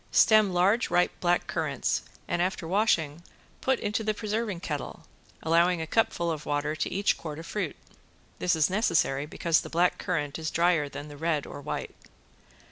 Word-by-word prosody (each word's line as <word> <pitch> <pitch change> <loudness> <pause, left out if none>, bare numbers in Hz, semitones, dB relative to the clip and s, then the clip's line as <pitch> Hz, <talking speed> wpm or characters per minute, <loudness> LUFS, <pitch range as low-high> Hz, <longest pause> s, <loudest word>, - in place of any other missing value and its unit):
Stem 215 -3 +5
large 190 +6 +2
ripe 180 0 +3
black 175 0 +2
currants - - -1 0.3
and 175 - 0
after 180 -2 -1
washing 170 -6 +1 0.4
put 260 -1 +1
into 210 +2 -1
the 215 0 0
preserving 215 -3 -2
kettle, 150 -5 -5 0.4
allowing 170 +2 +3
a 160 - -2
cupful 170 -2 +1
of 155 -2 -4
water 145 +1 -1
to - - -2
each 200 +2 +1
quart 155 -3 -6
of 165 - -8
fruit. 190 -7 -3 0.6
This 175 -1 +2
is 160 -1 +3
necessary 150 - +1
because 165 +1 +1
the - - -8
black 175 +2 +2
currant 150 -4 -2
is 160 -1 -2
drier 170 -4 +2
than 145 +1 -7
the 145 -1 -10
red 155 -1 0
or - - -8
white. - - -4
170 Hz, 175 wpm, -28 LUFS, 155-195 Hz, 0.6 s, Stem